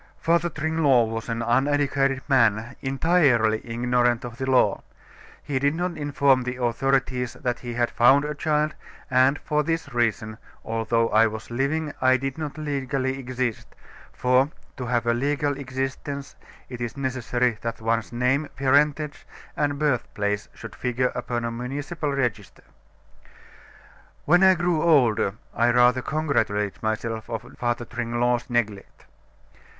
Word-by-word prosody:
"Father 170 Hz, +1 st, +1 dB
Tringlot 150 Hz, -7 st, +2 dB
was 115 Hz, +1 st, -5 dB
an 115 Hz, 0 st, -2 dB
uneducated 135 Hz, +2 st, +1 dB
man, 120 Hz, -3 st, +2 dB
entirely 135 Hz, -6 st, +2 dB
ignorant 120 Hz, +1 st, 0 dB
of 120 Hz, -1 st, -9 dB
the 130 Hz, 0 st, -2 dB
law. 130 Hz, -1 st, +3 dB, 0.6 s
He 135 Hz, -2 st, -2 dB
did 145 Hz, +3 st, +1 dB
not 175 Hz, 0 st, -2 dB
inform 140 Hz, -3 st, +2 dB
the 125 Hz, 0 st, -4 dB
authorities 125 Hz, +1 st, 0 dB
that 125 Hz, -2 st, -3 dB
he 120 Hz, -1 st, -6 dB
had 120 Hz, 0 st, 0 dB
found 135 Hz, +4 st, +5 dB
a 150 Hz, -, -3 dB
child, 150 Hz, +1 st, 0 dB, 0.4 s
and, 130 Hz, +2 st, +4 dB
for 150 Hz, 0 st, 0 dB
this 165 Hz, -1 st, -3 dB
reason, 110 Hz, -2 st, -1 dB, 0.3 s
although 115 Hz, +1 st, 0 dB
I 110 Hz, +1 st, +5 dB
was 110 Hz, +1 st, -7 dB
living, 145 Hz, +5 st, -1 dB
I 130 Hz, 0 st, +5 dB
did 135 Hz, +3 st, -4 dB
not 150 Hz, -1 st, -5 dB
legally 135 Hz, -3 st, -2 dB
exist, 125 Hz, -3 st, -4 dB, 0.4 s
for, 125 Hz, +3 st, +2 dB, 0.3 s
to 125 Hz, -3 st, -5 dB
have 120 Hz, 0 st, 0 dB
a 120 Hz, -, +2 dB
legal 145 Hz, +3 st, 0 dB
existence 135 Hz, +1 st, -5 dB, 0.3 s
it 125 Hz, -2 st, -8 dB
is 120 Hz, +2 st, -4 dB
necessary 125 Hz, -3 st, -1 dB
that 115 Hz, -1 st, -4 dB
one's 115 Hz, 0 st, -1 dB
name, 125 Hz, +5 st, 0 dB
parentage, 145 Hz, +2 st, +1 dB, 0.3 s
and 145 Hz, -1 st, 0 dB
birthplace 105 Hz, -8 st, -1 dB
should -, -, -9 dB
figure 125 Hz, 0 st, -1 dB
upon 120 Hz, -1 st, -3 dB
a 115 Hz, -, -2 dB
municipal 145 Hz, +6 st, -4 dB
register. 120 Hz, -7 st, -3 dB, 1.6 s
"When 175 Hz, +4 st, +5 dB
I 190 Hz, -1 st, +6 dB
grew 175 Hz, -2 st, 0 dB
older, 125 Hz, -, +3 dB, 0.2 s
I 120 Hz, +1 st, +2 dB
rather 125 Hz, +1 st, +4 dB
congratulated 125 Hz, -10 st, -1 dB
myself 110 Hz, 0 st, -3 dB
on 115 Hz, +2 st, -6 dB
Father 120 Hz, -1 st, -1 dB
Tringlot's 120 Hz, +1 st, -1 dB
neglect. 110 Hz, -5 st, -2 dB
130 Hz, 140 wpm, -24 LUFS, 120-145 Hz, 1.6 s, I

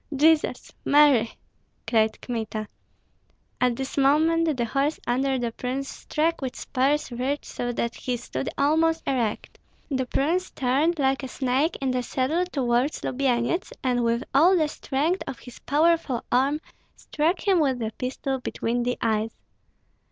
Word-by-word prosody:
"Jesus, 310 Hz, +2 st, +2 dB
Mary!" 280 Hz, -6 st, +4 dB, 0.5 s
cried 220 Hz, -2 st, +2 dB
Kmita. 220 Hz, -3 st, -4 dB, 0.9 s
At 250 Hz, -1 st, +3 dB
this 265 Hz, +2 st, -3 dB
moment 315 Hz, +2 st, +3 dB
the 240 Hz, -, 0 dB
horse 275 Hz, +6 st, 0 dB
under 265 Hz, +2 st, +1 dB
the 240 Hz, -2 st, -2 dB
prince 260 Hz, +4 st, -4 dB
struck 325 Hz, +1 st, -1 dB
with 260 Hz, -2 st, -4 dB
spurs 280 Hz, +2 st, 0 dB
reared 260 Hz, +4 st, -2 dB
so 245 Hz, 0 st, -3 dB
that 235 Hz, 0 st, -2 dB
he 250 Hz, -2 st, -3 dB
stood 135 Hz, -, -4 dB
almost 320 Hz, +3 st, +2 dB
erect; 240 Hz, -6 st, -2 dB, 0.3 s
the 260 Hz, -2 st, 0 dB
prince 340 Hz, +9 st, 0 dB
turned 280 Hz, +7 st, +1 dB
like 270 Hz, -1 st, +1 dB
a 265 Hz, -, -5 dB
snake 265 Hz, +5 st, 0 dB
in 270 Hz, -1 st, 0 dB
the 255 Hz, 0 st, 0 dB
saddle 270 Hz, +8 st, 0 dB
toward 260 Hz, -2 st, +1 dB
Lubyenyets, 260 Hz, +5 st, 0 dB
and 245 Hz, -2 st, +1 dB
with 235 Hz, +2 st, +1 dB
all 345 Hz, +7 st, +6 dB
the 310 Hz, -3 st, +1 dB
strength 300 Hz, +7 st, -1 dB
of 255 Hz, -, -5 dB
his 245 Hz, -, -13 dB
powerful 300 Hz, -4 st, +1 dB
arm 275 Hz, +5 st, +2 dB, 0.3 s
struck 335 Hz, +6 st, -1 dB
him 380 Hz, -3 st, +4 dB
with 270 Hz, -5 st, +2 dB
the 220 Hz, -2 st, -3 dB
pistol 265 Hz, +1 st, -2 dB
between 240 Hz, -1 st, -2 dB
the 245 Hz, +1 st, -1 dB
eyes. 220 Hz, 0 st, 0 dB
265 Hz, 150 wpm, -25 LUFS, 245-300 Hz, 0.9 s, all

